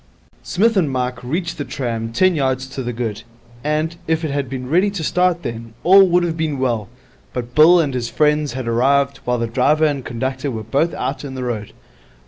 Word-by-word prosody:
Psmith 225 +5 +1
and 175 -7 +2
Mike 125 -1 -3
reached 170 +6 -3
the - - -1
tram 115 -5 -4
ten 185 +10 +3
yards 130 -4 0
to 135 0 -6
the 120 -1 -3
good; 115 -2 -4 0.4
and, 155 +3 -1
if 160 0 0
it 150 - -2
had 140 -2 -2
been 130 -1 -5
ready 180 +8 +3
to 195 -5 -5
start 180 +1 +1
then, 115 -1 -6
all 190 +2 +7
would 175 0 +3
have 170 -2 -1
been 160 -3 -2
well. 120 -5 -1 0.4
But 120 -1 -5
Bill 165 +5 +7
and 145 -5 0
his 120 -2 -2
friends 150 -2 +1
had 130 -2 -5
arrived 140 +4 +2
while 125 0 +1
the 115 - -1
driver 140 +7 +2
and 145 -3 -1
conductor 130 +4 -3
were 110 -4 -4
both 140 +10 0
out 140 - -3
in 135 -2 -6
the 130 - -4
road. 110 -4 -4
135 Hz, 210 wpm, -19 LUFS, 125-160 Hz, 0.4 s, all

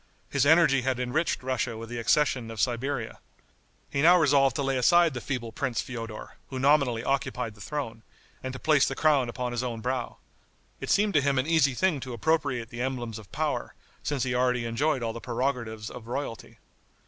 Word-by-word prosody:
His 140 0 +2
energy 160 -4 +5
had 130 -1 -1
enriched 130 +4 -1
Russia 130 -3 -2
with 115 +1 -7
the 120 +1 -5
accession 125 -1 +2
of 115 -1 -7
Siberia. 120 0 -1 0.7
He 140 - 0
now 175 +4 +7
resolved 140 -5 +4
to 140 - -1
lay 135 0 0
aside 170 +5 +4
the 125 - -5
feeble 120 -4 -4
prince 120 +1 -2
Feodor, 115 -3 -6
who 135 - -5
nominally 135 -4 +3
occupied 125 -4 -1
the 105 - -16
throne, 115 -6 -4 0.4
and 130 - -4
to 130 - -6
place 150 -1 +3
the - - -3
crown 145 -6 +3
upon 125 +1 -3
his 120 -1 -2
own 120 -3 -3
brow. 125 +1 -3 0.6
It - - -6
seemed 205 +1 +3
to 150 - +4
him 140 -1 +1
an 130 - +2
easy 155 -5 +3
thing 180 -1 +1
to 130 0 -6
appropriate 125 -2 0
the 120 -1 -6
emblems 120 -4 -3
of 100 -4 -15
power, - - -2 0.3
since 140 -4 -1
he 125 - -1
already 125 -1 +1
enjoyed 130 +3 0
all 115 -1 -2
the 115 - -7
prerogatives 120 -3 -3
of 120 -2 -10
royalty. 120 -2 -5
130 Hz, 195 wpm, -27 LUFS, 120-140 Hz, 0.7 s, now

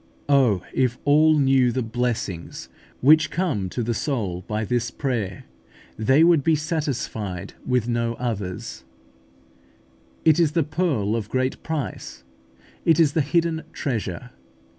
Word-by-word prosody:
Oh, 125 -10 +3
if 125 -2 +1
all 155 +2 +5
knew 135 -3 +3
the 130 +1 -1
blessings 115 -6 -3 0.3
which 155 +4 +5
come 145 - -1
to 120 - -3
the 120 +1 -1
soul 105 - -2
by 110 +1 -2
this 120 +1 -1
prayer, 115 -9 -3 0.5
they 130 +8 +4
would 165 -4 +5
be 160 +2 +3
satisfied 125 - -3
with 125 -3 +1
no 115 -1 -1
others: 105 -7 -5 1.4
it 160 0 +5
is 160 -3 +3
the 165 -1 +2
pearl 140 - 0
of 110 -3 -3
great 130 0 -1
price; 150 - -5 0.6
it 165 -1 +3
is 155 -3 +4
the 160 - +2
hidden 165 +2 0
treasure. 115 - -4
125 Hz, 135 wpm, -23 LUFS, 110-150 Hz, 1.4 s, all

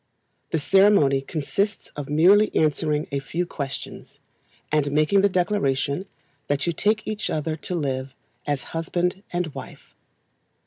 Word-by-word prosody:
The - - 0
ceremony 160 -5 +4
consists 175 +8 -2
of 145 -1 -6
merely 190 +8 +5
answering 150 0 +1
a 140 - 0
few 165 +6 -3
questions, 135 -6 -7 0.5
and 150 -2 +1
making 155 +7 +3
the 200 - +4
declaration 180 -4 0 0.4
that 145 0 0
you 170 - 0
take 215 +5 +1
each 215 -1 -3
other 155 0 -1
to 180 - -4
live 135 -4 -3 0.3
as 145 -2 -1
husband 175 +3 -1
and 175 -4 -2
wife. - - -10
155 Hz, 135 wpm, -24 LUFS, 145-185 Hz, 0.5 s, merely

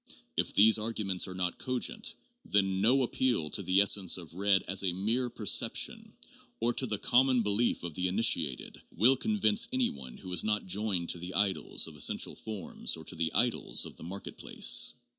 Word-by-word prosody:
If - - -2
these 110 +2 +6
argu 110 -1 -3
ments 95 -2 0
are 90 - -8
not 90 -1 -3
cogent, 130 - -2 0.3
then 95 -2 0
no 130 +6 +3
appeal 120 -10 -1
to - - -2
the 95 +1 +3
essence 100 -3 +3
of 85 -3 -11
red 95 +1 +1
as 95 +1 0
a 90 -2 0
mere 115 +7 -1
perception, 110 -3 0 0.5
or 120 +1 +1
to 130 - 0
the 105 -2 -3
common 125 +2 +2
belief 105 +1 0
of 85 -2 -6
the 90 +3 -1
initiated, 85 - 0
will 120 +8 +4
con 215 - -2
vince 210 +3 +3
any 255 -1 0
one 65 -2 -10
who 90 - -9
is 90 - +2
not 105 -1 -1
joined 95 -2 -2
to 85 - 0
the 90 +1 -7
idols 100 0 +2
of 80 - -7
essential 75 - +1
forms 105 -6 -4
or 80 - -12
to 90 - -5
the 80 -1 -2
idols 120 -1 +1
of - - -11
the - - -10
market 95 +4 -8
place. - - +3
100 Hz, 200 wpm, -30 LUFS, 90-120 Hz, 0.5 s, these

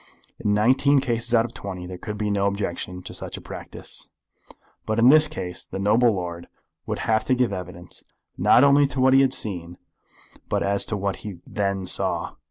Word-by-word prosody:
In 105 0 +1
nineteen 130 +6 +4
cases 120 -4 0
out 115 -1 +4
of 120 - -8
twenty 95 -3 -6
there 90 0 -8
could 105 +2 -6
be 105 0 -1
no 100 -1 +1
objection 90 -2 -3
to - - -8
such - - -6
a - - -7
practice. - - -8 0.8
But 110 - 0
in 115 +2 +6
this 155 +2 +7
case 95 -12 -5
the - - -7
noble 110 +5 +3
lord 85 -3 -5 0.4
would - - -2
have 110 -1 +2
to 130 - +2
give 125 -5 +1
evidence 90 -1 -7 0.3
not 125 - +5
only 140 0 +6
as - - -2
to 130 - -3
what 130 0 +5
he 135 - +7
had 135 -1 +3
seen, 90 -7 -2 0.7
but - - 0
as 100 0 +2
to 105 - -1
what 100 -1 -2
he 105 -4 -8
then 100 -2 -2
saw. - - -1
105 Hz, 200 wpm, -24 LUFS, 95-120 Hz, 0.8 s, this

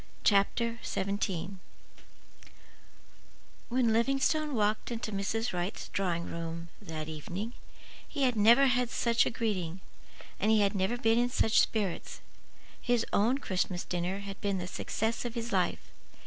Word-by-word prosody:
CHAPTER 230 +3 +2
XVII 195 -1 -2 2.1
When 240 -2 +2
Livingstone 275 +5 +2
walked 210 0 +1
into 230 -2 -4
Mrs. 210 +3 -1
Wright's 180 +2 -3
drawing 175 -3 -1
room 165 0 -5
that 160 -5 -6
evening 175 +9 -5 0.5
he 285 -3 -2
had 250 -2 +3
never 230 +6 +6
had 250 -2 +2
such 235 -1 +2
a - - +2
greeting, 190 -7 -2 0.6
and 210 - +2
he 220 -1 +5
had 200 0 +2
never 195 +4 0
been 225 -1 +3
in 245 0 +2
such 220 -3 +3
spirits. 205 -6 -1 0.6
His 245 -2 +1
own 230 +6 +3
Christmas 185 -7 -1
dinner 180 +3 -2
had 200 0 -8
been 200 -2 0
the 180 - -3
success 220 +4 -2
of 240 -1 -5
his 235 0 -3
life. - - 0
215 Hz, 140 wpm, -31 LUFS, 190-235 Hz, 2.1 s, never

